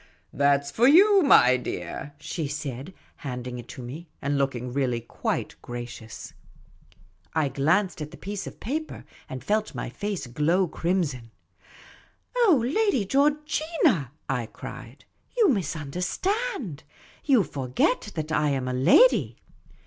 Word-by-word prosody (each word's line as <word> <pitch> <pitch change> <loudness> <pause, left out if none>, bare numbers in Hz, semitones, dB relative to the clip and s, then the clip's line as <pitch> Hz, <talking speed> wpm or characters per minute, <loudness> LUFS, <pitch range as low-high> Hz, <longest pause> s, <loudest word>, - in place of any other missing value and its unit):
" - - -41
That 140 0 +4
's 140 - -6
for 235 - +4
you, 390 +7 +7
my 130 - +6
dear," 125 +5 -6
she 155 0 -4
said, 145 +2 -5 0.2
handing 125 -3 -5
it 120 - -10
to 130 - -9
me, 150 +7 -8
and 145 0 -1
looking 125 -3 -1
really 130 -3 0
quite 115 - -3
gracious. 120 -2 -8 1.0
I 155 -3 +2
glanced 160 +8 +1
at 150 - -4
the - - -12
piece 200 0 -5
of - - -10
paper 310 +6 -4 0.2
and 130 -1 -6
felt 215 +4 0
my - - -4
face 205 -7 -4
glow 155 +9 +1
crim 180 +3 0
son. 130 -7 -6 0.6
" - - -26
Oh, 390 - +4
Lady 320 - +1
Georgina," 295 - +1 0.2
I 125 -4 -1
cried; - - -10
" - - -36
you 440 -6 +5
misunderstand. 185 - -2 0.4
You 260 -8 +4
forget 135 - -1
that 155 -1 -3
I 150 -1 +2
am 135 -2 -1
a 130 - -1
lady." 140 - +5
155 Hz, 145 wpm, -26 LUFS, -, 1.0 s, you